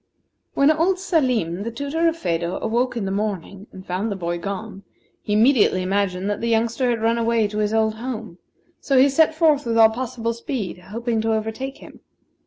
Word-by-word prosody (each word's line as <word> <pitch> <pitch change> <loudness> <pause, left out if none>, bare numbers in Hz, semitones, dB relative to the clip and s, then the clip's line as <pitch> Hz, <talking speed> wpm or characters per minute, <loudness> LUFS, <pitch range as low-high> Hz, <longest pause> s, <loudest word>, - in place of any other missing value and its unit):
When 280 +2 +5
old 335 +5 +2
Salim, 255 - 0
the 225 - -3
tutor 285 +8 -1
of 330 0 0
Phedo, 170 - -2
awoke 240 +2 -1
in 215 - -2
the 190 - -2
morning 200 -1 -4
and 190 0 -12
found 190 +5 -2
the - - -2
boy 175 -2 -3
gone, 200 +2 -6 0.4
he 210 - -3
immediately 215 -4 +4
imagined 190 0 -1
that 205 0 -2
the 235 - -1
youngster 230 +3 +1
had 230 -2 -1
ran 230 +1 +2
away 230 -2 +2
to 210 +1 -4
his 210 0 0
old 220 0 +2
home; 220 -5 -6 0.4
so 275 - +1
he 260 +2 +7
set 315 +3 +3
forth 310 -3 +3
with 230 -1 -1
all 225 -1 +7
possible 230 -1 -3
speed, 230 -6 -5
hoping 225 +4 -3
to 225 0 0
overtake 220 +5 -3
him. - - -14
225 Hz, 195 wpm, -22 LUFS, 200-255 Hz, 0.4 s, he